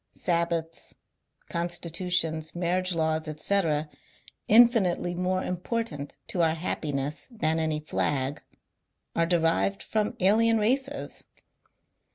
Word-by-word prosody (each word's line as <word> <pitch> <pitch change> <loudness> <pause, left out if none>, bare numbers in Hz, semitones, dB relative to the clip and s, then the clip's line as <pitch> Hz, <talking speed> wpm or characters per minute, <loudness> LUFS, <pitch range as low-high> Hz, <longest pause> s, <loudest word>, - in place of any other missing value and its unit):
Sabbaths, 170 -1 -1 0.5
constitutions, 170 -2 -1
marriage 180 +1 0
laws, 160 -1 0
etc., 155 -1 +1 0.6
infinitely 215 -6 +5
more 185 +1 -1
important 180 -5 -4
to 175 - -1
our 160 -1 +3
happiness 150 -4 -2
than 160 -9 0
any 155 -1 0
flag, 145 -2 -1 0.7
are 165 0 +2
derived 170 +3 +1
from 215 -1 -1
alien 225 +4 +4
races. 270 +6 0
170 Hz, 95 wpm, -27 LUFS, 160-195 Hz, 0.7 s, infinitely